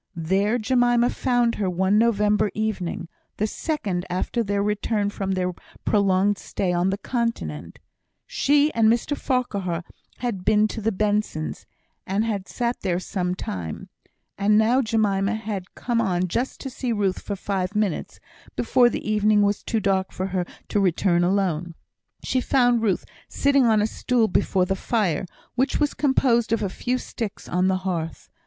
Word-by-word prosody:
There 190 +7 +1
Jemima 245 0 +3
found 245 -2 +1
her 190 - +1
one 190 +3 +2
November 210 -2 +3
evening, 195 -6 -2 0.3
the 210 - +1
second 210 - -2
after 185 +6 -1
their 200 -1 0
return 210 0 0
from 195 -1 -2
their 180 -1 -1 0.3
prolonged 200 -1 +2
stay 180 -2 -2
on 175 +2 +2
the 195 - -1
Continent. 230 - -3 0.5
She 290 +2 +2
and 225 -1 +4
Mr 240 +5 +1
Farquhar 200 - -1 0.3
had 230 -7 -3
been 215 +1 +4
to 220 - -5
the 225 +2 +1
Bensons, 205 -6 -1 0.4
and 200 +4 0
had 205 -4 -2
sat 240 0 -2
there 180 -3 0
some 180 -1 -2
time; 90 - -5 0.5
and 210 +1 +4
now 230 +5 +4
Jemima 215 -3 +1
had 210 -4 -5
come 235 -2 0
on 185 -4 0
just 240 +9 -2
to 270 - -5
see 250 0 -3
Ruth 200 -4 0
for 205 - -4
five 195 0 -3
minutes, 210 -5 -1 0.4
before 245 +1 +4
the - - -5
evening 210 -1 +3
was 205 0 +1
too 225 - -1
dark 190 -2 0
for 185 - -3
her 180 -2 0 0.2
to 205 - +1
return 175 -1 +2
alone. 175 -3 0 0.5
She 255 - 0
found 245 -3 +3
Ruth 205 -5 0 0.2
sitting 280 -2 +3
on 215 -2 +4
a - - +3
stool 230 +1 +1
before 185 -1 +1
the 190 - -1
fire, 190 -5 0 0.3
which 260 +3 0
was 295 -1 +1
composed 250 -5 +2
of 225 -1 +1
a 195 - 0
few 250 +7 -2
sticks 225 -4 -6
on 180 +2 +1
the 190 0 +2
hearth. 165 -4 -4
210 Hz, 165 wpm, -24 LUFS, 185-235 Hz, 0.5 s, and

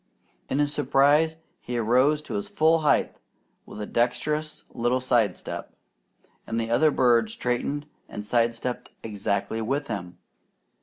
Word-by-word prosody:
In 135 - 0
his 145 0 +1
surprise 150 +3 +3 0.2
he 120 0 -4
arose 130 +7 +3
to - - -7
his 205 0 -3
full 165 -4 +3
height 150 -2 +2 0.5
with - - -9
a 105 - -3
dexterous 150 +7 -1
little 120 +2 +1
side 120 -7 +2
step, - - -7 0.7
and 115 - -1
the 115 0 -2
other 155 +7 +5
bird 120 -5 +3
straightened 125 +6 -2 0.2
and 105 - -7
side 115 +1 +2
stepped 125 +1 -4
exactly 105 +1 -2
with 135 +5 -2
him. 90 -5 -5
125 Hz, 145 wpm, -26 LUFS, 115-150 Hz, 0.7 s, other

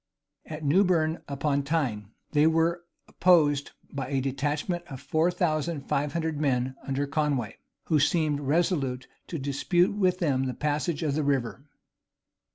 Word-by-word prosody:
At 155 0 -7
Newburn 165 0 +2
upon 140 0 0
Tyne, 135 -9 -1 0.2
they 150 0 +4
were 165 +2 +1 0.2
opposed 150 -6 +3 0.2
by 135 -1 -3
a 135 -2 0
detachment 145 +6 -2
of 135 - -8
four 155 +5 +1
thousand 165 -3 -1
five 140 +1 -1
hundred 160 -3 -2
men 130 -3 +1
under 140 +1 -2
Conway, 140 -6 -1 0.3
who 155 -3 +2
seemed 150 0 +2
resolute 140 -4 0 0.2
to 165 - -4
dispute 145 +7 +1
with 185 -3 +2
them 135 -7 +1
the 130 - -4
passage 150 +2 -1
of 150 -3 0
the 155 - 0
river. 135 -1 -1
150 Hz, 145 wpm, -27 LUFS, 140-165 Hz, 0.3 s, they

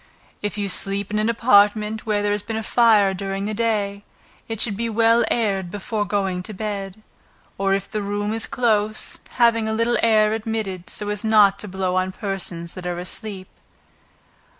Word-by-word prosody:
If 205 0 -3
you 205 -1 -1
sleep 195 +1 +1
in 210 - 0
an 215 +2 +1
apartment, 215 -1 +3
where 205 -1 +1
there 205 - +1
has 205 0 0
been 220 +2 -4
fire 215 -5 +4
during 195 +1 -4
the 215 - -2
day, 205 -3 -1 0.4
it 225 -2 -4
should 215 -3 +1
be 230 +3 -2
well 230 +1 +4
aired 195 -6 0
before 205 +2 -3
going 195 -3 -1
to 210 +3 -8
bed, 200 0 -5 0.6
or 195 0 +2
if 195 - -4
the 215 - -2
room 205 +1 -2
is 225 0 -3
close, 215 -3 -1
have 235 -2 +4
a 230 - -1
little 230 +2 +1
air 215 -2 +4
admitted, 215 -5 -4
so 205 - -2
as 210 0 -1
not 210 -3 +5
to 210 - -5
blow 185 -1 -2
on 185 0 0
persons 185 -5 -3
that 180 -1 -7
are 175 -1 -3
asleep. 185 +2 -6
205 Hz, 180 wpm, -22 LUFS, 195-220 Hz, 0.6 s, not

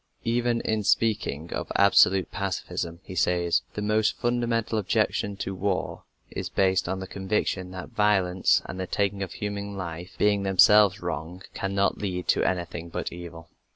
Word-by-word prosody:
Even 120 0 +1
in 110 -1 0
speaking 100 -8 0
of - - -4
"absolute" 95 -1 +5
pacifism 90 -4 -4
he 95 - -9
says, 85 -1 +1
"The 105 - -3
most 110 0 +1
fundamental 120 -2 0
objection 100 0 0
to 95 - -4
war 95 0 -2 0.3
is - - -4
based 95 -1 +1
on 95 - -2
the 95 - -5
conviction 95 -1 -2
that 90 -1 -8
violence 95 -3 +2
and 95 - -7
the 95 - -3
taking 100 0 -1
of 95 -3 -4
human 100 -1 -5
life, 85 0 -6
being 105 -1 +2
themselves 100 +1 +5
wrong, 85 +2 -5
cannot 100 0 0
lead 90 -3 -3
to - - +3
anything 85 -2 -2
but - - -4
evil." 85 -2 -10
95 Hz, 155 wpm, -26 LUFS, 90-105 Hz, 0.3 s, absolute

